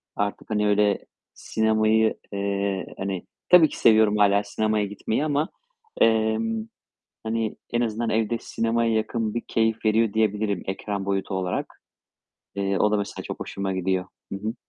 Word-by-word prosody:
Artık, 100 0 -3
hani, 105 -1 +1
öyle 105 0 +2 0.3
sinemayı, 110 0 +2 0.2
eee, 100 -1 -1
hani 95 -2 -3 0.3
Tabii 170 -4 +8
ki - - -8
seviyorum 110 -2 +5
hâlâ 100 0 +4
sinemaya 105 0 0
gitmeyi 110 +7 -2
ama, 150 +1 0 0.5
emm, 110 0 +2 0.6
hani, 110 -1 -2 0.2
en 120 - +2
azından 115 0 -1
evde 110 +1 +1
sinemaya 115 0 0
yakın 110 0 -1
bir 120 - -2
keyif 110 0 0
veriyor 110 0 +3
diyebilirim 105 -3 0
ekran 100 +1 -3
boyutu 95 0 -1
olarak. 90 -1 -3 0.7
Eee, 100 -1 0
o 105 - +3
da 105 - +2
mesela 100 -1 -4
çok - - -6
hoşuma 100 -1 -3
gidiyor. 95 0 0 0.3
Hı 95 - -3
hı. 110 +3 -3
110 Hz, 145 wpm, -25 LUFS, 100-110 Hz, 0.7 s, Tabii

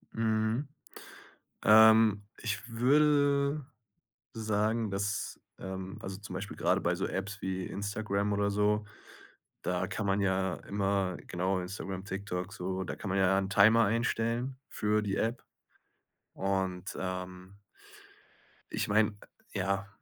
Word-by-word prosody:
Mhm. 110 +4 +1 1.0
Ähm, 110 -1 +7 0.2
ich 115 0 -3
würde 140 +3 +3 0.7
sagen, 110 0 0
dass, 100 0 -2 0.2
ähm 95 0 -6
also 95 0 -5
zum 100 -3 -9
Beispiel 100 +2 -5
grade - - +2
bei - - +1
so - - -2
Apps 100 +1 -4
wie 95 -1 -2
Instagram 100 0 -2
oder 100 0 +1
so, 105 +1 +2 0.8
da - - -1
kann - - -3
man 95 +1 +2
ja 95 -1 +1
immer 100 -2 0
genau, 95 +2 0
Instagram, 95 +1 -5
TikTok, 95 -1 -4
so, 95 -1 -3
da - - -5
kann - - -6
man 100 - +1
ja 95 0 +4
'n 95 -1 -1
Timer 110 +3 +6
einstellen 115 +3 0
für 105 0 +1
die 100 -2 -1
App. 115 +3 -1 0.9
Und, 95 -1 -2
ähm 90 +1 -6 1.1
ich - - -1
meine, 105 0 +3 0.4
ja, 100 +1 -1
100 Hz, 125 wpm, -31 LUFS, 95-110 Hz, 1.1 s, Ähm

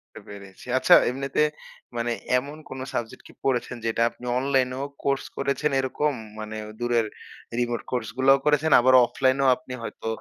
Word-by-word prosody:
বুঝতে - - -12
পেরেছি। 100 0 -12
আচ্ছা - - +6 0.2
এমনিতে 135 +3 -1 0.5
মানে 120 0 -1 0.3
এমন 140 +4 -6
কোন 130 0 -7
সাবজেক্ট 115 -1 -4
কি - - -15
পড়েছেন, 125 -1 0
যেটা 115 +1 0
আপনি 125 - -15
অনলাইনেও 130 0 0 0.2
কোর্স 140 -1 0
করেছেন, 140 +2 0
এরকম 145 +3 0 0.3
মানে 110 0 -6 0.2
দূরের 120 -2 +1 0.5
রিমোট 120 -1 -1
কোর্স 125 - -2
গুলোও 135 +1 +5
করেছেন। 150 +1 +2
আবার 130 +1 +4
অফলাইনেও 130 +2 +1
আপনি 160 -5 -12
হয়তো 115 - -7
130 Hz, 155 wpm, -25 LUFS, 120-140 Hz, 0.5 s, আচ্ছা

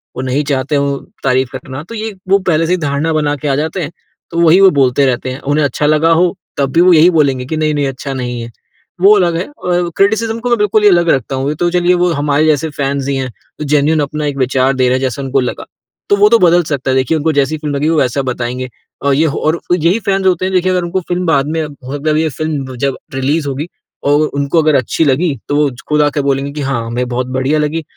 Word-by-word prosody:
वो 130 - -4
नहीं 135 +3 -1
चाहते 135 +2 -1
हो 140 0 0 0.3
तारीफ 130 -1 +1
करना 130 +1 -7
तो 230 - -7
ये 220 0 -4 0.2
वो 195 +1 +5
पहले 165 0 +2
से 175 - -1
ही - - +1
धारणा 150 +1 -1
बना 150 -1 0
के 145 +1 -5
आ 135 - +1
जाते 160 +5 -2
हैं 150 - -4 0.4
तो 170 - -2
वही 170 +2 +5
वो 195 - +8
बोलते 135 0 +3
रहते 130 0 -1
हैं। 130 +1 -6
उन्हें 150 0 +2
अच्छा 145 +1 -1
लगा 155 +2 +3
हो 175 +3 +2 0.2
तब 135 -2 0
भी 170 - +4
वो 180 0 +6
यही 165 +3 +6
बोलेंगे 140 -6 +1
कि 155 +4 -3
नहीं-नहीं 150 -2 0
अच्छा 135 +1 -5
नहीं 125 -2 -4
है। 115 0 -8 0.5
वो 200 +3 +7
अलग 175 -3 +1
है 180 - -3
और 175 -1 -1
क्रिटिसिज़्म 220 +3 +1
को 245 +1 -3
मैं 240 - +3
बिल्कुल 210 +1 +2
ही 210 - +7
अलग 175 -2 +3
रखता 135 -1 0
हूँ। 135 +1 -2
वो 145 - 0
तो 175 - +3
चलिए 180 0 +2
वो 180 - +2
हमारे 145 +1 +1
जैसे 155 +1 +1
फैंस 140 -1 -2
ही 140 - -1
हैं 135 -1 -2 0.3
जो - - -2
जेन्युइन 150 +2 +2
अपना 150 +1 -3
एक 145 -1 -3
विचार 130 +1 +1
दे 130 -1 +1
रहे 125 - +2
हैं - - -5
जैसा 130 +1 -2
उनको 135 0 0
लगा। 125 -2 -3 0.4
तो 200 - +5
वो 205 +1 +5
तो 230 +1 +5
बदल 175 -1 +4
सकता 140 -4 -2
है 130 - +1
देखिए 130 +5 +1
उनको 155 +1 0
जैसी 145 +2 +1
फ़िल्म 150 -2 -4
लगी 145 +3 0
वो 165 - +1
वैसा 130 +2 0
बताएँगे। 125 +1 -4 0.4
और 140 - +3
ये 155 +4 +2
हो 145 - -2
और 160 +2 +1
यही 175 +5 +2
फैंस 195 -2 -1
होते 185 -1 +2
हैं 190 - -2
देखिए 185 0 +2
अगर 180 -1 0
उनको 175 +2 -2
फ़िल्म 180 +1 -1
बाद 145 -4 +2
मे 160 -1 -1
मतलब 145 +2 -3
ये 160 0 +1
फ़िल्म 145 -5 -3
जब 135 +1 -1 0.2
रिलीज़ 140 +3 -1
होगी 140 +4 -3 0.4
और 145 +2 +3
उनको 140 +3 0
अगर 155 -1 +2
अच्छी 130 +5 +1
लगी 145 +2 +1
तो 145 - 0
वो 145 -1 +2 0.2
खुद 150 0 +3
आके 145 0 +1
बोलेंगे 140 0 -1
कि 150 - -5
हाँ 135 -4 -2
हमें 120 +2 -3
बहुत 125 +1 -2
बढ़िया 140 +4 +1
लगी 155 +2 -1
150 Hz, 255 wpm, -14 LUFS, 135-170 Hz, 0.5 s, वो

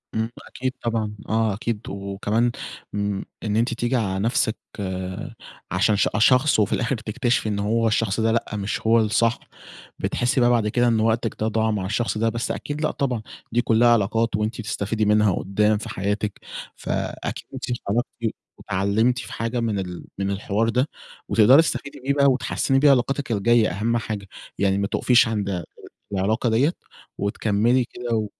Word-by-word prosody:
إمم، 110 +1 0 0.2
أكيد 130 0 -3
طبعًا، 115 -2 -1 0.2
آه 110 -1 +2
أكيد، 105 +1 -3
وكمان 100 +4 -1 0.4
م 100 -1 -1 0.2
إن 105 -1 -1
أنتِ 115 +3 +1
تيجي 120 +2 -1
على 95 -5 0
نَفسِك 110 +1 +1 1.1
عشان 105 - +3
ش 100 - +3
أ - - +1
شخص 130 +2 +4
وفي 105 - +2
الآخِر 125 +2 0
تكتشفي 110 +1 -1
إن 100 -1 -1
هو 115 +3 +1
الشخص 110 -1 +1
ده، 110 0 +2
لأ 115 +1 +1
مش 100 -1 -3
هو 115 +1 +4
الصح، 115 +2 +2 0.6
بتحسّي 125 +1 +1
بقى 120 - +5
بعد 115 -3 +2
كده 120 +3 +2
إن 115 -2 +3
وقتِك 115 +1 +1
ده 110 - 0
ضاع 110 0 +1
مع 100 -3 -2
الشخص 105 +1 -1
ده، 115 +1 +2
بس 115 +2 -2
أكيد 145 +1 -4
لأ 155 - +1
طبعًا، 125 -5 -1 0.3
دي 120 +1 +2
كُلّها 115 +1 +3
علاقات 115 0 +2
وأنتِ 110 +2 -2
بتستفيدي 105 +1 -1
منها 105 0 +4
قُدّام 105 +2 +1
في 105 - -7
حياتِك 100 +1 -2 0.4
فأكيد - - -4
أنتِ 130 - -7
اتعرّفتِ 120 +1 -1 0.5
واتعلّمتِ 105 +6 +1
في - - -8
حاجة 115 +1 -2
من 110 -4 -1
ال 90 -2 -6
من 100 0 -1
الحوار 100 +3 0
ده 125 +5 +1 0.4
وتقدَري 125 +8 +6
تستفيدي 140 -3 -3
بيه 135 +2 0
بقى 140 0 +3
وتحسّني 135 0 +2
بيه 145 0 +6
علاقاتِك 135 0 +1
الجاية، 115 +1 +3
أهم 115 +6 0
حاجة 105 -3 -4 0.3
يعني 100 -1 +2
ما 100 0 0
تُقفيش 125 +2 +4
عند 100 -5 -2 0.5
العلاقة 110 +5 +1
دِيّة 135 +9 +3 0.5
وتكمّلي 110 +4 +1
كده 120 0 -6
و 110 -1 0
110 Hz, 170 wpm, -23 LUFS, 105-120 Hz, 1.1 s, وتقدَري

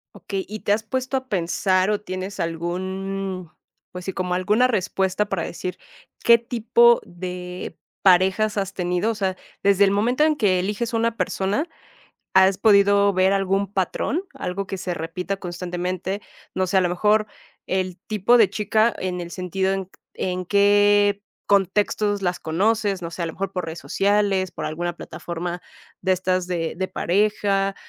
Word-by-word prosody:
Okey, 195 -1 -4
¿y 215 +1 -7
te 205 - -1
has 215 +1 -1
puesto 260 +4 -2
a 260 0 -6
pensar 185 +1 +1
o 210 -1 +1
tienes 185 0 -6
algún? 185 +2 -3 0.4
Pues 180 0 -8
sí, 190 - -3
como 180 -1 -2
alguna 210 +7 +3
respuesta 190 -2 0
para 190 -5 -2
decir 180 +1 -5 0.5
qué 235 0 +7
tipo 235 0 +3
de 180 0 -7 0.3
parejas 190 +4 +4
has 195 -1 -2
tenido. 180 +4 0
O - - -4
sea, 190 -3 -1 0.3
desde 200 0 +5
el 195 - +4
momento 235 +8 +2
en 310 0 +3
que 195 -9 +2
eliges 210 +5 -2
a - - +2
una 230 0 0
persona, 205 - -1 0.7
¿has 190 0 +5
podido 200 -1 +5
ver 185 +1 +3
algún 195 0 0
patrón, 205 - -1
algo 190 +2 -4
que 195 - -4
se 180 -1 -3
repita 180 +4 -4
constantemente? 180 +2 -4 0.3
No 185 0 +1
sé, 190 +1 +2
a - - +5
lo 175 - +1
mejor 210 +4 +2 0.4
el 185 -1 -1
tipo 215 +3 +3
de 210 -5 +5
chica 215 +2 +2
en 180 -1 -3
el 170 0 -7
sentido, 190 +1 -1
¿en 195 -1 -3
q 185 - -35 0.2
en 185 0 -3
qué 205 +1 +4 0.3
contextos 205 +1 +1
las 180 -1 -1
conoces? 200 +3 0
No 170 -1 -5
sé, 175 - -6
a - - 0
lo 165 - -4
mejor 195 0 -4
por 180 -2 -2
redes 165 +1 -6
sociales, 200 -2 +1
por - - -5
alguna 175 +2 -3
plataforma 175 +1 -5 0.4
de 190 - +1
estas 185 0 0
de 170 -3 -2
de 190 +1 -1
pareja, 195 +1 +1
195 Hz, 170 wpm, -23 LUFS, 180-205 Hz, 0.7 s, qué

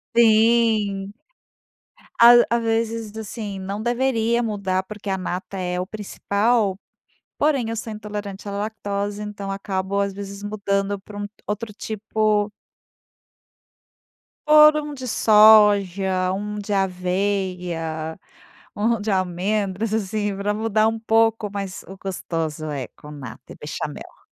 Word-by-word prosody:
Sim. 220 -3 +3 1.1
A 235 +1 +10 0.2
às 235 0 +1
vezes, 225 -1 -1
assim, 210 -2 -6
não 200 +3 -4
deveria 240 -1 +1
mudar, 200 -5 -1
porque 210 +1 -10
a 190 - 0
nata 185 +2 -5
é 180 0 -2
o 180 - -2
principal, 210 +1 0 0.6
porém 280 -6 +1
eu - - -2
sou 225 0 -5
intolerante 205 -1 -6
à - - -4
lactose, 205 0 -3
então 205 -1 -6
acabo, 195 0 -2
às 200 -1 0
vezes, 200 0 -8
mudando 200 -1 -1
para 205 +1 -10
um 205 - -3 0.2
outro 210 +1 -3
tipo 215 0 0 2.0
por 305 0 +8
um 300 -1 -4
de 260 -2 -7
soja, 200 -4 +5
um 210 +2 -4
de 205 +1 -6
aveia, 180 -4 -1 0.6
um 225 +1 +1
de 210 +1 -2
amêndoas, 195 +3 -1
assim, 205 -1 -1
para 200 +1 -1
mudar 215 0 +1
um 225 0 -2
pouco, 225 -1 +2
mas 195 -3 -5
o 190 - -9
gostoso 165 -5 -4
é 140 -5 -4
com 150 - -14
nata, 145 -3 -10
é - - -12
Bechamel. - - -7
205 Hz, 130 wpm, -22 LUFS, 195-220 Hz, 2.0 s, A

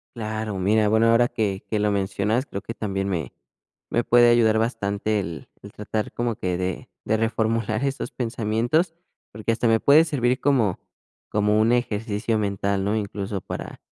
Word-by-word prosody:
Claro, 110 -3 -4
mira, 105 +3 +3
bueno, 110 +1 +4
ahora 120 +1 +4
que 100 -4 -2
que 110 - 0
lo 105 0 +2
mencionas, 100 +5 0
creo 100 - -6
que 115 - -7
también, 95 -3 -3
me 85 -6 -3 0.6
me 120 - +1
puede 120 0 +5
ayudar 110 -2 +4
bastante, 105 -2 -1
el 85 -3 -7
el 100 - -10
tratar 105 +1 -3
como 120 -2 -1
que 90 -2 -2
de 90 0 -4 0.2
de 110 - +1
reformular 115 +1 0
estos 135 0 -3
pensamientos. 120 - 0 0.4
Porque 110 +2 -2
hasta 115 +1 0
me 115 - +4
puede 145 +6 +6
servir 125 -4 0
como 120 -10 +2 0.5
como 105 0 +2
un 115 +2 +3
ejercicio 110 -2 0
mental, 100 -1 -1
¿no? 105 +2 0
Incluso, 100 -1 -4
para - - -7
110 Hz, 170 wpm, -24 LUFS, 100-115 Hz, 0.6 s, puede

